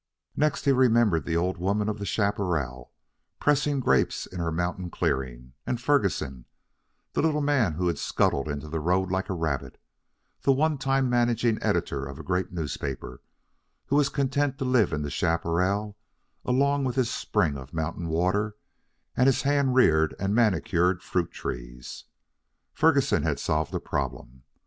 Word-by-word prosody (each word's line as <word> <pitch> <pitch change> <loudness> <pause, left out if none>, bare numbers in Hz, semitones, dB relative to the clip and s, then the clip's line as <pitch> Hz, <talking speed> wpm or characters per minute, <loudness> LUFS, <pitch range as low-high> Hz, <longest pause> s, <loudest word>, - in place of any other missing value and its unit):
Next 150 -1 0
he 140 - +5
remembered 115 - +3
the 85 - 0
old 90 +1 -1
woman 100 +3 0
of 105 -1 -2
the 100 - -4
chaparral, 90 - -1 0.5
pressing 145 -1 +2
grapes 130 - +1
in 90 - -8
her 85 -1 -1
mountain 90 +2 -2
clearing; 65 -4 -2
and 125 - -2
Ferguson, 100 - 0 0.7
the - - +1
little 155 -1 +2
man 140 - +2
who 90 +4 -2
had 85 -4 0
scuttled 70 +2 +1
into 75 0 -4
the 80 +1 -3
road 90 +3 +1
like 95 +2 -1
a 95 - -1
rabbit, 80 -5 -3 0.6
the 140 - +3
one 150 +1 +1
time 135 -1 +1
managing 120 -2 +1
editor 70 -1 0
of 70 0 -7
a - - -8
great 90 0 -1
newspaper, 70 -6 -5 0.6
who 140 - 0
was 145 -1 +3
content 140 0 0
to 135 - -3
live 125 -6 +3
in 75 -1 -2
the 75 - -4
chaparral 90 +7 0 0.5
along 140 +3 +2
with 125 -2 -1
his 130 -3 +1
spring 75 -3 0
of 65 0 -9
mountain 85 +1 -3
water 95 +6 0 0.6
and 125 - +4
his 135 - +2
hand 140 -2 +2
reared 80 -11 +4
and 100 +1 -1
manicured 90 -4 +2
fruit 90 -2 -1
trees. - - -7 0.7
Ferguson - - +3
had - - -1
solved 75 -1 -1
a - - 0
problem. 65 +2 -4
95 Hz, 160 wpm, -26 LUFS, 80-125 Hz, 0.7 s, he